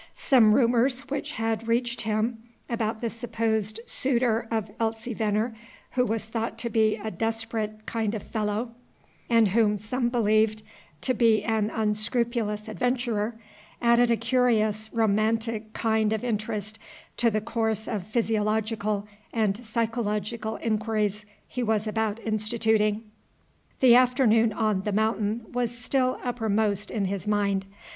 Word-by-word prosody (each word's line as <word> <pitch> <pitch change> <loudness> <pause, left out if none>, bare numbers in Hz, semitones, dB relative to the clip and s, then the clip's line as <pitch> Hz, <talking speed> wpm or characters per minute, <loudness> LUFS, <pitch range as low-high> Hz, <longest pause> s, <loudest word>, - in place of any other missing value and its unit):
Some 230 -6 +5
rumors 250 +1 +3
which 280 - -3
had 225 0 -2
reached 235 +1 0
him 220 +1 -1 0.3
about 225 -2 -2
the 235 - -1
supposed 225 -2 -2
suitor 235 -3 0
of 220 -2 -2
Elsie 225 +1 -2
Venner, 215 +2 0 0.4
who 250 - +2
was 220 0 -2
thought 225 0 -3
to 235 0 -4
be 215 -1 +3
a 215 0 -5
desperate 225 -1 -3
kind 225 -1 -1
of 210 - -5
fellow, 215 +2 -2 0.6
and 230 -3 +5
whom 210 0 +3
some 240 +4 -1
believed 215 -2 +2 0.4
to 255 - +1
be 225 -2 +3
an 220 -2 +1
unscrupulous 215 0 0
adventurer, 235 -1 -1 0.4
added 235 0 +4
a 235 - +3
curious, 220 -4 +1
romantic 220 0 0
kind 220 -1 +1
of 220 - -2
interest 215 -2 -2 0.4
to 235 - +4
the 215 -1 0
course 220 0 -1
of 205 -4 -3
physiological 215 -2 0 0.2
and 220 0 0
psychological 220 -1 -2
inquiries 215 -2 -1 0.2
he 250 - -4
was 220 -2 +1
about 220 0 -1
instituting. 215 0 +1 0.8
The 255 -3 +8
afternoon 245 -3 +4
on 215 -3 0
The 210 +1 -2
Mountain 220 +1 0
was 240 -1 -2
still 255 +1 0
upper 240 -3 -2
most 205 -1 +1
in 205 -3 -1
his 195 +1 -3
mind. 200 -2 +1
220 Hz, 135 wpm, -26 LUFS, 215-235 Hz, 0.8 s, The